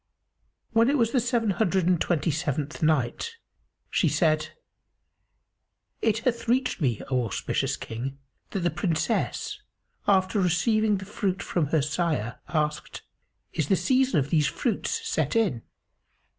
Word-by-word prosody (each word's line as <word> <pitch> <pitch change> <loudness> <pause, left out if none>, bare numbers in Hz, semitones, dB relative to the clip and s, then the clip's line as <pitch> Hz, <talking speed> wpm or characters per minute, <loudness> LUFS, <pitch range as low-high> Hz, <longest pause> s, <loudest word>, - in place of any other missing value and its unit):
When 230 +2 +4
it 290 - +3
was 230 -3 +2
the 255 - +3
Seven 235 -3 +1
Hundred 190 -2 +1
and 180 -2 +2
Twenty 165 -2 +1
seventh 150 -1 -2
Night, 155 - 0 0.5
She - - +3
said, 155 -2 +2 1.5
It 220 -1 +2
hath 235 -2 0
reached 250 -4 +1
me, 120 -7 0
O 125 -1 +2
auspicious 100 - -1
King, 130 +4 -5 0.3
that 195 - -3
the 175 - +1
Princess, 180 - -1 0.5
after 195 +1 +3
receiving 210 +4 +2
the 190 - -7
fruit 195 -2 -2
from 165 -5 0
her 150 0 +2
sire, 150 -7 -1
asked, 150 0 -2 0.5
"Is 155 - -1
the 195 - +4
season 260 - +2
of 140 0 -2
these 150 -4 +3
fruits 450 - -2
set - - 0
in?" 200 - +2
180 Hz, 140 wpm, -26 LUFS, 150-225 Hz, 1.5 s, When